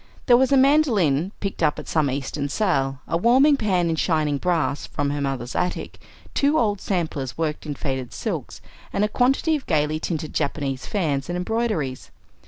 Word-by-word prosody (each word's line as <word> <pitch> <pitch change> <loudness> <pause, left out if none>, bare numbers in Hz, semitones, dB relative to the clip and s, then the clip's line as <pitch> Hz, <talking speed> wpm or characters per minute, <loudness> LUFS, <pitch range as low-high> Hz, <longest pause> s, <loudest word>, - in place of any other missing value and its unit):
There 245 - +6
was 260 +2 +3
a 275 - +5
mandolin, 220 - +3
picked 195 -3 -4
up 150 -2 +2
at - - -8
some 155 -3 +1
Eastern 140 +2 -3
sale, 135 -8 0
a 165 - 0
warming 260 - +5
pan 190 -8 +1
in 165 - 0
shining 155 -4 +1
brass 160 -5 0
from 145 -1 -2
her 145 0 -2
mother's 135 -3 -3
attic, 180 0 -2 0.3
two 290 +2 +2
old 205 -6 +1
samplers 155 -8 -2
worked 155 -2 -2
in 145 - -3
faded 130 -4 -4
silks, - - -5 0.3
and 205 - +1
a - - +1
quantity 265 +8 +2
of 290 - -6
gayly 155 -1 +1
tinted 155 -2 -4
Japanese 140 -3 -2
fans 150 -8 -1
and 175 - -2
embroideries. 180 - -2
160 Hz, 180 wpm, -23 LUFS, 145-215 Hz, 0.3 s, There